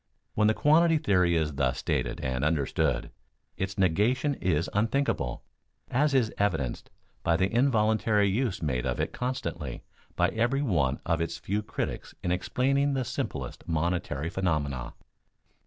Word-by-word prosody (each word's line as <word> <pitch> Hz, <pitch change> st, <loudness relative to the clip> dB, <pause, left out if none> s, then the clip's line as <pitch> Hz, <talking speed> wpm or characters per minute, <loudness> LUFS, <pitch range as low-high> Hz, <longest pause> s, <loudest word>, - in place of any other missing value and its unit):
When 105 Hz, 0 st, +3 dB
the 110 Hz, -, +3 dB
quantity 160 Hz, +2 st, +4 dB
theory 90 Hz, -, +2 dB
is 80 Hz, -2 st, 0 dB
thus 70 Hz, -2 st, 0 dB
stated -, -, -1 dB
and 65 Hz, 0 st, -2 dB
understood, 75 Hz, -3 st, 0 dB, 0.4 s
its 95 Hz, +1 st, -3 dB
negation 105 Hz, -, +2 dB
is 85 Hz, -, 0 dB
unthinkable, 110 Hz, -, 0 dB, 0.5 s
as 145 Hz, +2 st, +2 dB
is 120 Hz, -4 st, +2 dB
evidenced 80 Hz, -12 st, -1 dB, 0.3 s
by 85 Hz, 0 st, +2 dB
the 95 Hz, +4 st, 0 dB
involuntary 110 Hz, -4 st, +3 dB
use 100 Hz, -3 st, -1 dB
made 65 Hz, -3 st, -1 dB
of 65 Hz, -, -2 dB
it -, -, -1 dB
constantly 125 Hz, -, -4 dB, 0.3 s
by -, -, +3 dB
every 120 Hz, +5 st, +1 dB
one 75 Hz, -, +1 dB
of 85 Hz, -1 st, +1 dB
its 85 Hz, 0 st, -2 dB
few 105 Hz, +2 st, -2 dB
critics 105 Hz, -, -5 dB
in 90 Hz, -, 0 dB
explaining 135 Hz, +9 st, +1 dB
the 130 Hz, -2 st, -1 dB
simplest -, -, -5 dB
monetary 85 Hz, -2 st, -1 dB
phenomena. 75 Hz, -10 st, -1 dB
95 Hz, 140 wpm, -28 LUFS, 80-125 Hz, 0.5 s, quantity